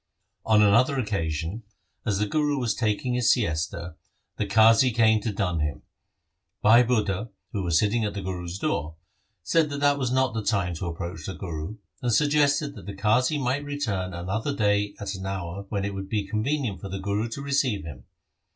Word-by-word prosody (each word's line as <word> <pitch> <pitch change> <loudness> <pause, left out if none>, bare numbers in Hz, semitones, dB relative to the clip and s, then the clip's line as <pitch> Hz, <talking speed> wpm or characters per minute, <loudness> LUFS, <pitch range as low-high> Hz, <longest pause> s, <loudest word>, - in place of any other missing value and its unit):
On 105 -1 +5
another 115 +7 +4
occasion, 90 - -2 0.5
as 100 -3 +1
the 105 - +1
Guru 145 +5 0
was 120 -5 0
taking 115 +3 -1
his 125 -1 +3
siesta, 85 -5 -1 0.4
the 105 - -1
Qazi 110 +5 +6
came 110 -2 +4
to 110 - -2
dun 95 -5 -1
him. 75 -2 -2 0.8
Bhai 115 +3 +7
Budha, 110 -3 0 0.2
who 100 - -1
Was 85 -3 +2
sitting 110 +4 +2
at 105 -1 -2
the 100 - -4
Guru's 90 -1 -4
door, 80 - -2 0.5
said 160 - +2
that 145 0 -4
that 145 0 +3
was 125 -3 -1
not 130 -2 +2
the 110 -1 -2
time 95 -5 0
to 90 - -4
approach 85 +2 -5
the 95 - -4
Guru, 85 +1 -5 0.3
and 125 -2 0
suggested 145 +2 +3
that - - -12
the 100 - -5
Qazi 125 +9 +2
might 135 +2 0
return 110 -11 -3
another 100 +11 -2
day 105 -2 +1
at 100 -1 -4
an 95 -1 -5
hour 95 0 -5
when 100 -2 -1
it 100 - -3
would 95 0 -6
be 105 -2 -1
convenient 110 - -1
for 100 - -6
the 95 - -4
Guru 100 +4 -1
to 125 +5 -6
receive 135 - 0
him. 65 -6 -9
105 Hz, 190 wpm, -26 LUFS, 95-125 Hz, 0.8 s, Bhai